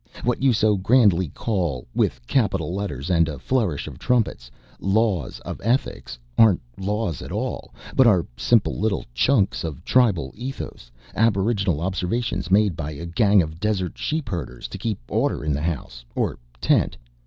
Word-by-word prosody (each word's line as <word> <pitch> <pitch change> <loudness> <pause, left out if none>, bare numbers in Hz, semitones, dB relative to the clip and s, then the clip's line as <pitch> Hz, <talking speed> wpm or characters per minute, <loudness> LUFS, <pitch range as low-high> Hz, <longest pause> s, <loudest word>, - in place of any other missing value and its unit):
What 125 0 0
you 135 -1 +5
so 105 -2 +3
grandly 95 -4 +4
call 85 - -2
with - - 0
capital 95 - 0
letters 95 -6 -3
and 85 -2 +3
a 75 - -5
flourish 105 - 0
of - - -9
trumpets 110 - 0 0.3
'Laws 95 - 0
of - - -7
Ethics' 115 - -1 0.2
aren't 110 -6 +6 0.2
laws 100 - -2
at - - -8
all, - - -3 0.2
but 130 - +6
are 95 -7 +4
simple 115 - +2
little 105 -2 0
chunks 100 - +2
of 80 -5 -6
tribal 100 - +2
ethos, 125 - -7 0.2
aboriginal 100 -6 +1
observations 95 +3 -2
made 100 -2 +4
by 75 -3 -4
a 85 +4 -7
gang 100 +3 +4
of 80 +1 -8
desert 100 -4 -1
sheepherders 95 - -3
to - - -7
keep 110 -3 -2
order - - 0
in 75 - +1
the 70 - -2
house 65 -7 -4
or - - -1 0.2
tent. - - +2
95 Hz, 155 wpm, -23 LUFS, 80-110 Hz, 0.3 s, aren't